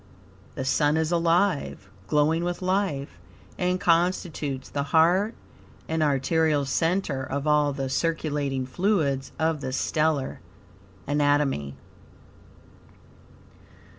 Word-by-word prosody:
The 130 - -4
Sun 145 +3 +2
is 160 +1 0
alive, 170 0 +1 0.2
glowing 155 +3 +2
with 175 +1 -3
life, 185 -7 -1 0.4
and 180 0 0
constitutes 165 -6 0
the 140 - -3 0.2
heart 185 +7 +3 0.5
and 160 0 -1
arterial 150 +1 +2
center 165 0 0
of 140 +2 -4
all 150 -1 +3
the 135 -1 -3
circulating 140 -1 -1
fluids 145 -3 0
of 160 -2 0
the 130 -1 -4
stellar 150 +1 0 0.7
anatomy. 145 - +1
150 Hz, 100 wpm, -25 LUFS, 140-170 Hz, 0.7 s, heart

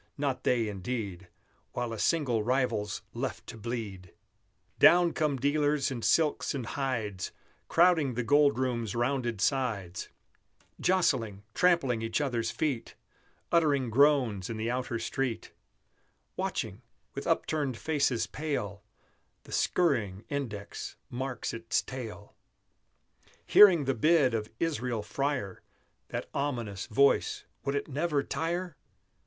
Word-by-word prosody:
Not 135 -3 -1
they, 120 -3 +2
indeed, 100 -2 -4 0.5
While 120 -2 -2
a 110 - -6
single 135 -9 +2
rival's 115 -4 0
left - - -4
to - - -8
bleed! 105 -6 -6 0.6
Down 175 -1 +6
come 150 -3 0
dealers 145 +1 +1
in 120 -3 -4
silks 155 +2 +2
and 130 -4 -3
hides, 115 -8 -3 0.4
Crowding 165 -7 +4
the 125 - -1
Gold 145 +1 +4
Room's 120 -5 -1
rounded 120 -2 0
sides, 105 -7 -1 0.7
Jostling, 115 - +1
trampling 170 -10 +3
each 115 +3 -1
other's 120 -6 -1
feet, 135 -3 -2 0.6
Uttering 145 -7 +3
groans 125 -7 +3
in 115 - -4
the 110 +2 -1
outer 125 -1 -2
street; 115 +1 -3 0.8
Watching, - - -3 0.3
with - - -5
upturned 145 -6 0
faces 140 -6 +1
pale, 105 -10 -4 0.6
The - - -14
scurrying 115 - +1
index 110 -8 -5 0.2
mark 130 +1 -3
its 115 0 -1
tale; 115 -5 -8 1.1
Hearing 180 -8 +7
the 135 - +1
bid 140 0 +3
of 110 -1 -2
Israel 125 -9 -1
Freyer, 135 -7 -2 0.5
That - - -4
ominous 120 -9 -2
voice, 140 +4 +3 0.2
would 140 0 -1
it 140 - -2
never 150 0 0
tire? 170 +2 -2
125 Hz, 120 wpm, -30 LUFS, 115-145 Hz, 1.1 s, Hearing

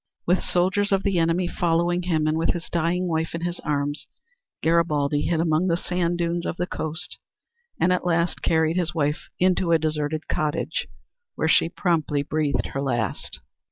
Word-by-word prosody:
With 180 +2 +3
soldiers 190 +3 +1
of 195 0 +2
the 195 -4 +1
enemy 165 +2 +2
following 175 +1 +1
him, 165 -4 0
and 155 0 +2
with 165 +1 +1
his 170 -1 -7
dying 170 +2 +1
wife 160 -1 -1
in 165 - -4
his 175 0 -3
arms, 145 0 -2 0.6
Garibaldi 150 -3 +2
hid 165 0 0
among 165 +2 +2
the 170 -2 +2
sand 175 -1 -1
dunes 170 0 -1
of - - -3
the 175 - 0
coast 160 -3 -5 0.6
and 180 +1 +4
at 180 - 0
last 170 -1 0
carried 160 +1 +2
his 170 -3 0
wife 150 -1 -1
into 180 -1 +2
a 165 - +6
deserted 155 0 -2
cottage 155 - -1 0.5
where 160 - 0
she 160 - +4
promptly 160 -6 0
breathed 145 -3 0
her 135 - -1
last. 120 -7 -2
165 Hz, 175 wpm, -24 LUFS, 155-175 Hz, 0.6 s, a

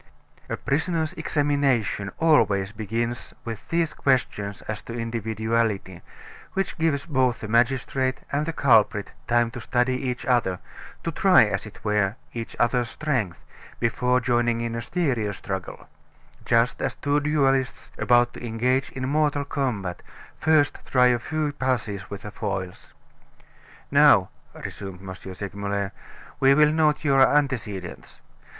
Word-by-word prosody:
A - - -2
prisoner's 160 +3 -1
examination 140 - 0
always 105 -12 +3
begins 115 +3 -3
with 115 -2 -7
these 165 -2 +1
questions 105 -7 0
as 110 0 -5
to 115 - -8
individuality, 110 -4 -1 0.5
which 195 0 -1
gives 155 -4 +1
both 130 -6 +1
the 110 - -5
magistrate 130 +3 +1
and 145 +2 0
the - - 0
culprit 110 -8 +3 0.2
time 120 -1 +2
to 120 - -7
study 125 +3 0
each 125 0 -4
other, 120 -7 +2 0.5
to - - -2
try, - - +6
as - - -3
it - - -15
were, 105 -1 +1 0.2
each 115 -1 -6
other's 120 0 +2
strength, 125 - -2 0.3
before 125 +2 +2
joining 120 -1 +1
in 115 0 -2
a 115 - -3
serious 120 - -1
struggle; 95 -2 -6 0.6
just 115 +1 +2
as - - -1
two 145 +1 +1
duelists, 135 -3 0
about 120 0 +3
to - - -10
engage 125 +3 0
in 130 0 -3
mortal 145 0 +1
combat, 115 -11 -2 0.3
first 155 -2 +2
try 125 -1 +4
a 120 - 0
few 155 +3 -2
passes 115 -8 -2
with 100 -1 -7
the 105 - -7
foils. 95 -4 -5 1.0
"Now," - - +6 0.3
resumed 95 -2 -7
M. 95 - -5
Segmuller, 100 +1 -4 0.5
"we 135 0 +5
will 150 0 +5
note 155 -1 +2
your 135 -3 +4
antecedents. 125 -11 0
120 Hz, 135 wpm, -25 LUFS, 105-140 Hz, 1.0 s, try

